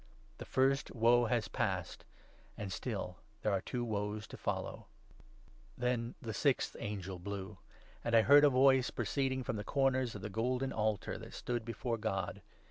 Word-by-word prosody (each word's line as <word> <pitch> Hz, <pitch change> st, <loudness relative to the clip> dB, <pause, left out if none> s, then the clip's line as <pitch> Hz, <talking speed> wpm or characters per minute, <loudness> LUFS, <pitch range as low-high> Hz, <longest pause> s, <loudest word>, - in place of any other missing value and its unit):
The -, -, -6 dB
first 135 Hz, +2 st, +1 dB
Woe 120 Hz, +1 st, +5 dB
has 110 Hz, -2 st, +1 dB
passed; -, -, -2 dB, 0.5 s
and 100 Hz, -2 st, -4 dB
still 100 Hz, -7 st, -4 dB, 0.3 s
there 105 Hz, -, +2 dB
are 95 Hz, -1 st, +1 dB
two 120 Hz, +4 st, -3 dB
Woes 105 Hz, -1 st, -2 dB
to -, -, -8 dB
12 -, -, -13 dB
follow! -, -, -3 dB, 0.9 s
Then 125 Hz, -1 st, -1 dB
the 110 Hz, -2 st, -5 dB
sixth 135 Hz, +6 st, +1 dB
angel 95 Hz, -4 st, -4 dB
blew; 100 Hz, +1 st, -6 dB, 0.4 s
and 115 Hz, -, +1 dB
I 115 Hz, -, +7 dB
heard 145 Hz, +3 st, +8 dB
a 145 Hz, -, +8 dB
voice 130 Hz, -1 st, +5 dB
proceeding 135 Hz, -2 st, -1 dB
13 -, -, -5 dB
from 115 Hz, -, -2 dB
the 105 Hz, -, -3 dB
corners 130 Hz, -1 st, +1 dB
of 100 Hz, -, -7 dB
the 110 Hz, -, -3 dB
golden 125 Hz, +5 st, 0 dB
altar 110 Hz, -1 st, -1 dB
that -, -, -10 dB
stood 120 Hz, -2 st, -2 dB
before 115 Hz, 0 st, -3 dB
God. 95 Hz, -5 st, -2 dB
115 Hz, 175 wpm, -34 LUFS, 105-130 Hz, 0.9 s, heard